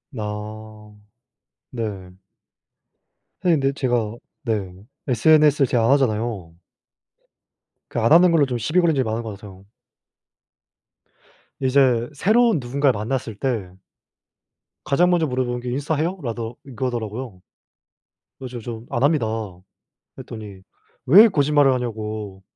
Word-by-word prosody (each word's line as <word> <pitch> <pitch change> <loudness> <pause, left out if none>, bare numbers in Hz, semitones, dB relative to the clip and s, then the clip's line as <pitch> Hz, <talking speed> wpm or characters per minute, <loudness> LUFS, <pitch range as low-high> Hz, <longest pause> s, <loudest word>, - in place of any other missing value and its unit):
아 105 0 -7 0.8
네. 105 -6 -5 1.3
사실 170 -5 +3
근데 135 0 +1
제가 120 -5 -1 0.3
네. 105 -7 -2 0.3
SNS 150 +3 +4
를 - - +3
제가 115 -2 +1
안 120 - +3
하잖아요. 110 -10 0 1.3
그 - - -3
안 115 - +2
하는 175 +2 +7
걸로 155 -4 +4
좀 125 -2 -3
시비 155 +10 +1
걸린 165 -3 +2
적이 130 - +1
많은 110 +1 -2
것 110 - -6
같아요. 100 -1 -13 1.9
이제 130 -3 +2
새로운 220 - +3
누군가를 135 -1 0
만났을 115 0 -3
때 110 -7 -3 1.1
가장 175 +6 +3
먼저 170 -3 +2
물어보는 125 -2 -2
게 125 - -5
"인스타 145 +4 -1
해요?" 170 +6 -1
라더 115 0 -4
이거더라고요. 120 -5 -5 1.0
그래 130 - -8
가지고 120 -2 -7
"저 115 +1 -7
안 120 - 0
합니다." 145 -5 +2 0.9
그랬더니 105 -4 -9 0.5
왜 205 - +8
거짓말을 145 -6 +3
하냐고 110 -5 -4
120 Hz, 255 characters per minute, -22 LUFS, 110-140 Hz, 1.9 s, 왜